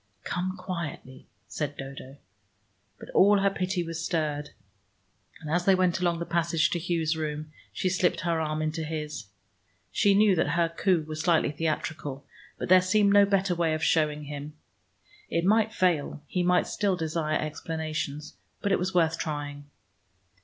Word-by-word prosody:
"Come 185 Hz, +2 st, -3 dB
quietly," 170 Hz, -8 st, -6 dB, 0.2 s
said 145 Hz, -2 st, -4 dB
Dodo. 135 Hz, 0 st, -8 dB, 0.8 s
But -, -, -11 dB
all 205 Hz, +2 st, +5 dB
her 195 Hz, 0 st, +2 dB
pity 185 Hz, -1 st, -1 dB
was 165 Hz, -1 st, -5 dB
stirred, 150 Hz, -3 st, -1 dB, 0.9 s
and 155 Hz, -, -9 dB
as 175 Hz, +2 st, +1 dB
they 195 Hz, -, +6 dB
went 185 Hz, -1 st, +2 dB
along 175 Hz, -1 st, +1 dB
the 170 Hz, -, -4 dB
passage 170 Hz, -1 st, +1 dB
to 175 Hz, -, 0 dB
Hugh's 165 Hz, -2 st, 0 dB
room, 155 Hz, -1 st, -4 dB, 0.2 s
she -, -, -2 dB
slipped 185 Hz, -1 st, +1 dB
her 165 Hz, -1 st, 0 dB
arm 155 Hz, 0 st, -1 dB
into 155 Hz, +1 st, -2 dB
his. 150 Hz, -7 st, -5 dB, 0.6 s
She 200 Hz, -1 st, +3 dB
knew 205 Hz, -1 st, +5 dB
that 155 Hz, -3 st, +1 dB
her 170 Hz, -1 st, +3 dB
coup 170 Hz, -1 st, +1 dB
was 155 Hz, 0 st, -4 dB
slightly 165 Hz, -3 st, +2 dB
theatrical, 150 Hz, -3 st, -3 dB, 0.3 s
but -, -, -4 dB
there 185 Hz, 0 st, +7 dB
seemed 200 Hz, +2 st, +3 dB
no 205 Hz, 0 st, +6 dB
better 195 Hz, -2 st, +2 dB
way 165 Hz, -2 st, +1 dB
of 155 Hz, -, -4 dB
showing 150 Hz, -2 st, +2 dB
him. 145 Hz, +1 st, -7 dB, 0.8 s
It 170 Hz, +1 st, 0 dB
might 220 Hz, +2 st, +3 dB
fail: 170 Hz, -8 st, 0 dB
he 180 Hz, -, -2 dB
might 180 Hz, 0 st, +3 dB
still 200 Hz, -3 st, 0 dB
desire 160 Hz, -2 st, -1 dB
explanations, 155 Hz, -1 st, -4 dB, 0.3 s
but 200 Hz, -, -1 dB
it -, -, +3 dB
was 180 Hz, +1 st, -2 dB
worth 165 Hz, -2 st, +2 dB
trying. 145 Hz, -2 st, -5 dB
165 Hz, 165 wpm, -27 LUFS, 155-180 Hz, 0.9 s, there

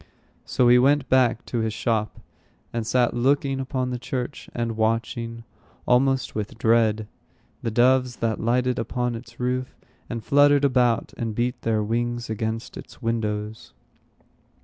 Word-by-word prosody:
So 125 Hz, -, +2 dB
he 125 Hz, 0 st, +7 dB
went 140 Hz, +2 st, +3 dB
back 125 Hz, -3 st, +3 dB
to 120 Hz, -, -2 dB
his 110 Hz, -1 st, -1 dB
shop, 110 Hz, -2 st, -1 dB, 0.5 s
and 115 Hz, -2 st, -2 dB
sat 125 Hz, -1 st, +2 dB
looking 135 Hz, +2 st, +1 dB
upon 130 Hz, -1 st, -2 dB
the 125 Hz, -, -3 dB
church, 125 Hz, +2 st, -5 dB
and 115 Hz, -1 st, -3 dB
watching, 115 Hz, +1 st, -1 dB, 0.4 s
almost 135 Hz, +2 st, +2 dB
with 105 Hz, 0 st, -4 dB
dread, 110 Hz, -2 st, +2 dB, 0.5 s
the 115 Hz, -, -2 dB
doves 125 Hz, +2 st, +3 dB
that 115 Hz, -2 st, -1 dB
lighted 125 Hz, +2 st, +1 dB
upon 125 Hz, +2 st, -2 dB
its 120 Hz, +1 st, -10 dB
roof, 125 Hz, +1 st, -2 dB, 0.3 s
and 115 Hz, -2 st, -4 dB
fluttered 145 Hz, +2 st, +4 dB
about, 125 Hz, -4 st, +2 dB
and 115 Hz, -2 st, -3 dB
beat 120 Hz, +2 st, -1 dB
their 110 Hz, -2 st, 0 dB
wings 120 Hz, +1 st, -2 dB
against 110 Hz, +1 st, -4 dB
its -, -, -11 dB
windows. 110 Hz, -1 st, -3 dB
120 Hz, 145 wpm, -24 LUFS, 115-125 Hz, 0.5 s, he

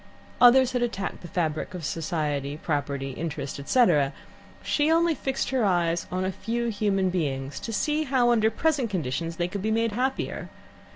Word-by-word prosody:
Others 255 Hz, +1 st, +7 dB
had 250 Hz, -, -1 dB
attacked 230 Hz, -5 st, -3 dB
the 175 Hz, -, -8 dB
fabric 165 Hz, -1 st, -2 dB
of 170 Hz, -4 st, -5 dB
Society 150 Hz, -3 st, -2 dB
Property, 140 Hz, -3 st, -2 dB
Interest, 145 Hz, -1 st, -5 dB
etc.; 150 Hz, -, +3 dB, 0.5 s
she 295 Hz, +1 st, +1 dB
only 335 Hz, 0 st, +4 dB
fixed 270 Hz, -3 st, -2 dB
her 260 Hz, -3 st, +1 dB
eyes 175 Hz, -3 st, +1 dB
on 185 Hz, +1 st, -1 dB
a 190 Hz, -, 0 dB
few 235 Hz, +4 st, -2 dB
human 200 Hz, -3 st, +1 dB
beings, 140 Hz, -6 st, -2 dB
to 230 Hz, -, -5 dB
see 300 Hz, +8 st, 0 dB
how, 250 Hz, -3 st, +3 dB
under 220 Hz, -2 st, +4 dB
present 275 Hz, 0 st, 0 dB
conditions, 165 Hz, -2 st, -2 dB
they 175 Hz, 0 st, -1 dB
could 195 Hz, +2 st, -5 dB
be 215 Hz, -, -1 dB
made 225 Hz, +1 st, +1 dB
happier. 255 Hz, +5 st, -2 dB
190 Hz, 170 wpm, -26 LUFS, 160-240 Hz, 0.5 s, Others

